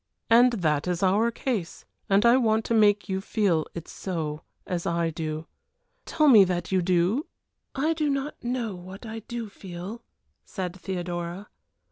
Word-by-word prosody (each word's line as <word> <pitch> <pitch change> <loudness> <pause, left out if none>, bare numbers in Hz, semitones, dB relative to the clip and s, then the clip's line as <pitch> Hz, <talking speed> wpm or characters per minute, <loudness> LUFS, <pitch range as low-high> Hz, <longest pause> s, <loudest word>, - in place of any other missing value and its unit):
And 245 +2 +7
that 155 -7 0
is 180 +1 -1
our 205 +5 +3
case, 230 -7 -3 0.2
and 200 +3 +4
I 235 +1 +7
want 225 -3 +2
to - - -1
make 210 -2 +4
you 190 -1 -2
feel 190 -7 +1
it 170 -1 -6
so, 160 -5 -4 0.2
as 175 -2 -3
I 170 -1 0
do. 155 0 -4 0.6
Tell 305 -1 +2
me 225 -8 +9
that 175 -2 -2
you 190 -1 +3
do 185 - +1 0.2
?" - - -53
"I 325 - +3
do 305 -2 0
not 275 0 -3
know 240 -3 -2
what 185 +4 -10
I 225 0 -6
do 230 +1 -6
feel," 190 +3 -8 0.4
said 185 -2 -5
Theodora. 175 0 -5
195 Hz, 165 wpm, -26 LUFS, 175-230 Hz, 0.6 s, me